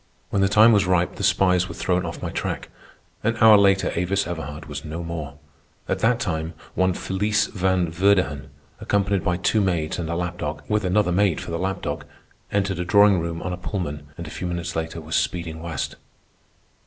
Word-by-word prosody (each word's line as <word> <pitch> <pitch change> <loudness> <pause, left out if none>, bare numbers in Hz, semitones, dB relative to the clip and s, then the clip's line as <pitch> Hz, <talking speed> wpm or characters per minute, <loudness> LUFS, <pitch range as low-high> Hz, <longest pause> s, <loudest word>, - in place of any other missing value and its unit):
When 100 - +1
the 95 - +3
time 110 +3 +7
was 100 -4 +3
ripe, 90 -1 +1
the - - -4
spies 90 -1 +3
were - - -7
thrown 90 -1 0
off 80 - -7
my - - -3
track. - - -3 0.5
An 115 +2 +1
hour 110 -1 +8
later 100 -1 +4
Avis 95 +3 0
Everhard 75 -3 -6
was 75 -1 -6
no 80 +2 -5
more. 80 -3 -6 0.5
At - - -1
that 115 +1 +2
time 80 -5 -3 0.2
one 95 0 +2
Felice 105 +2 0
Van 95 -4 0
Verdighan, 90 -5 +1 0.3
accompanied 100 -1 0
by 90 -1 +1
two 105 +4 +2
maids 85 -5 -1
and 80 -2 -3
a 85 - -1
lap 90 0 -3
dog, 75 0 -4
with 105 -2 0
another 95 0 +2
maid 95 -2 +2
for - - -7
the 85 - -2
lap 95 +1 -2
dog, - - -3 0.5
entered 100 -3 0
a - - 0
drawing 100 +1 +5
room 85 0 -4
on 90 - -3
a - - -4
Pullman, 85 -6 -4
and 85 - -6
a 75 - -8
few 90 - -4
minutes 85 -1 -4
later 80 0 -3
was 80 0 -4
speeding 85 -2 -1
west. 80 -4 -4
90 Hz, 205 wpm, -23 LUFS, 85-100 Hz, 0.5 s, hour